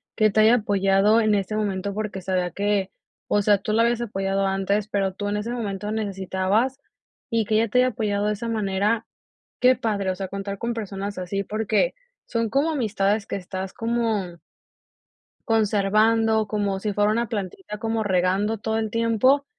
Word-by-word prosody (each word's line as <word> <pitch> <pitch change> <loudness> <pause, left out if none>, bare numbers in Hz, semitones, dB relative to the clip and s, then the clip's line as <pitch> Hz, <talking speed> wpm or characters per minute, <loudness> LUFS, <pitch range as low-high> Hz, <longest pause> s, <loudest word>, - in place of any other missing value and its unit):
que 215 0 +4
te 215 - +1
haya 220 +3 +6
apoyado 200 0 +3
en 215 -1 +3
ese 200 +2 -1
momento, 200 -2 -2
porque, 210 -2 -4
sabía 180 -1 -1
que, 200 -1 0 0.4
o 205 - +2
sea, 205 0 +4
tú 215 +2 -3
la 230 - +4
habías 235 0 +1
apoyado 195 -3 -1
antes, 195 +2 0
pero 195 -2 -1
tú 205 +2 -4
en 205 +1 -1
ese 220 +3 -3
momento 210 -3 -3
necesitabas 205 +4 -1 0.5
y 230 -2 +1
que 215 - 0
ella 225 +1 +3
te 250 +4 +3
haya 255 - +5
apoyado 205 -3 -1
de 210 - +1
esa 225 +3 -5
manera, 210 0 0 0.6
qué 255 +1 +5
padre, 200 -4 -1
o 185 - -2
sea, 190 0 -4
contar 200 +1 -5
con 235 +2 -2
personas 200 -2 -5
así, 195 +2 -3
porque, 215 - 0 0.3
son 230 -2 -1
como 285 +7 +1
amistades 210 -6 0
que - - -3
estás 190 0 -5
como 225 -7 -2 1.1
conservando, 220 +1 +3
como 200 -2 -1
si 210 +1 -2
fuera 205 +1 +2
una 235 +2 0
plantita 210 - -5
como 225 +1 -1
regando 195 +3 +1
todo 220 +1 -2
el 220 - -2
tiempo 230 +5 +2
210 Hz, 180 wpm, -24 LUFS, 195-225 Hz, 1.1 s, haya